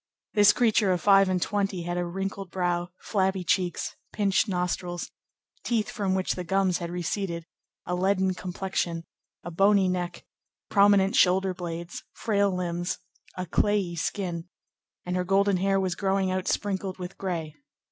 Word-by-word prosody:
This 205 -2 +7
creature 220 -5 +3
of 180 - +1
five 195 -1 +5
and 185 -1 +1
twenty 195 -1 -1
had 175 +1 -3
a 175 - 0
wrinkled 195 +1 -4
brow, 175 -1 -1
flabby 190 -2 0
cheeks, 175 +1 0 0.2
pinched 205 +1 +2
nostrils, 180 -1 -2 0.5
teeth 225 -3 0
from 195 -4 -1
which 190 -1 0
the 180 - -5
gums 190 0 +1
had 170 -1 -4
receded, 175 0 -3 0.4
a 180 - -2
leaden 190 +1 +2
complexion, 180 -2 -3 0.4
a 175 - -6
bony 195 +2 +4
neck, 180 -1 -3 0.5
prominent 200 -1 +5
shoulder 185 +1 +4
blades, 170 -1 -6
frail 200 -2 +1
limbs, 175 -1 -2 0.4
a 185 - -2
clayey 195 0 +1
skin, 175 -1 -3 0.6
and 180 0 -2
her 180 - +1
golden 195 +1 +3
hair 195 +1 +2
was 185 -2 0
growing 190 0 0
out 185 0 -2
sprinkled 195 -2 -1
with 180 0 -7
gray. 170 -5 -3
185 Hz, 150 wpm, -27 LUFS, 175-195 Hz, 0.6 s, This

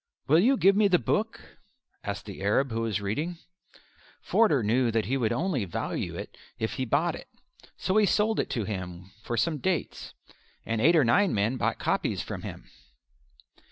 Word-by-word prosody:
"Will 155 +4 +5
you 255 +8 +4
give 195 -2 +5
me 210 0 +4
the 185 -2 +4
book?" 115 - -3 0.4
asked - - -5
the - - -9
Arab 110 +7 +1
who 115 0 -1
was 110 -2 -1
reading. 150 - -2 0.8
Forder 155 - +2
knew 120 +4 +2
that 115 -1 0
he 130 - -1
would 120 -5 0
only 145 - 0
value 90 - -3
it - - -7 0.2
if 110 -1 -2
he 130 - -2
bought 145 +8 +1
it, - - -9 0.5
so 190 +2 0
he 210 -2 +5
sold 215 +3 +2
it - - -1
to 115 - -2
him 90 -2 -6
for 120 +1 -4
some 150 +6 0
dates, 180 +2 -3 0.5
and 115 -1 -1
eight 165 +7 +5
or 155 - +5
nine 195 - +3
men 105 +5 +1
bought - - -1
copies - - -1
from - - -6
him. - - -8
130 Hz, 185 wpm, -27 LUFS, 110-175 Hz, 0.8 s, Will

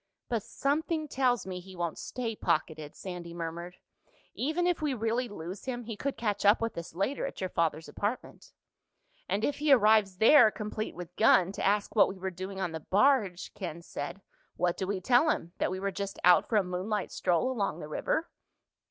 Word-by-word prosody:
"But 230 -3 0
something 310 - -1
tells 250 -5 +1
me 185 -1 -5
he 190 +1 -12
won't 170 -2 -3
stay 230 -3 -4
pocketed," 155 -4 -1
Sandy 175 -2 -7
murmured. 170 +1 -5 0.6
"Even 315 +7 -1
if 355 -2 +1
we 295 -4 0
really 230 +2 -1
lose 180 0 -7
him 245 -2 -3
he 225 -1 -6
could 280 +6 -3
catch 210 -3 -1
up 205 +2 +6
with 230 0 -2
us 170 -1 -7
later 200 +10 -1
at - - -8
your 185 -1 -3
father's 160 -1 0
apartment." 210 +5 -4 0.8
"And 200 +4 +1
if 290 - -2
he 300 0 +2
arrives 215 -6 +5
there, 225 +3 +7
complete 215 0 -5
with 175 0 -9
gun, 190 -4 +5
to - - -5
ask 205 +2 +1
what 210 - +6
we 190 - -7
were 190 0 -4
doing 190 +2 -6
on 180 -3 -1
the 160 - -4
barge," 200 - +2
Ken 170 -3 -6
said, 170 +5 -6 0.3
"what 175 -1 +1
do 190 - -3
we 195 -1 -2
tell 250 - +4
him? 170 - -1
That - - +1
we 185 +1 -3
were 200 +1 -1
just 200 +1 -5
out 180 +10 +6
for 230 - 0
a 205 - +4
moonlight 185 +3 -3
stroll 180 +8 +1
along 200 -9 -2
the 150 - -7
river?" 320 - -1
200 Hz, 200 wpm, -30 LUFS, 180-240 Hz, 0.8 s, there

